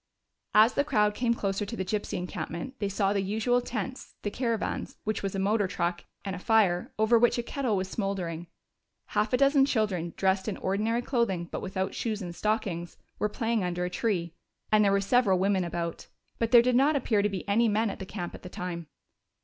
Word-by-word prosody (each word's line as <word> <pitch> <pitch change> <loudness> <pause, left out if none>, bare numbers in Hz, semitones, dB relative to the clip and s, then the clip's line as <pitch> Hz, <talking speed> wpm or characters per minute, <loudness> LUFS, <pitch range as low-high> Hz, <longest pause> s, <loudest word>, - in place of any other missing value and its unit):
As 220 +3 +7
the 285 - +2
crowd 210 -7 +2
came 235 +1 +1
closer 200 -1 -1
to 205 +3 -5
the 190 - -2
gypsy 210 +2 -2
encampment, 180 +5 -5
they 200 - -1
saw 200 0 +1
the 200 - +1
usual 220 +5 +1
tents, 245 +2 -5
the 205 - -2
caravan, 230 -3 -1 0.2
which 215 -1 -2
was 195 -1 -3
a - - -1
motor 200 +1 +2
truck, 175 -1 -2 0.2
and 195 -2 -3
a - - -6
fire, 195 -5 +2
over 220 +2 +4
which 240 +1 +3
a 240 - -1
kettle 245 -4 -1
was 185 0 -1
smoldering. 185 -5 -3 0.6
Half 215 - 0
a 250 - +3
dozen 275 0 +5
children, 205 -10 0
dressed 190 +1 +1
in 210 - -2
ordinary 220 +5 0
clothing 195 -10 0
but - - -4
without 190 0 -2
shoes 220 -3 -2
and 175 -4 -6
stockings, 195 -6 -2 0.2
were 210 - +1
playing 225 -1 -1
under 180 0 -1
a 180 - -4
tree, 180 -5 -1 0.4
and 215 0 +5
there 200 - +4
were 200 0 +3
several 200 -2 +3
women 190 0 +2
about. 170 -1 -4 0.3
But 230 - +1
there 240 -1 +8
did 250 0 +2
not 280 +4 +4
appear 230 -6 +2
to 210 - +1
be 195 -1 -5
any 225 +4 +3
men 215 0 +1
at - - -9
the 190 - -6
camp 175 -4 -5
at - - -10
the 180 - -9
time. 175 -3 -5
205 Hz, 215 wpm, -28 LUFS, 185-230 Hz, 0.6 s, there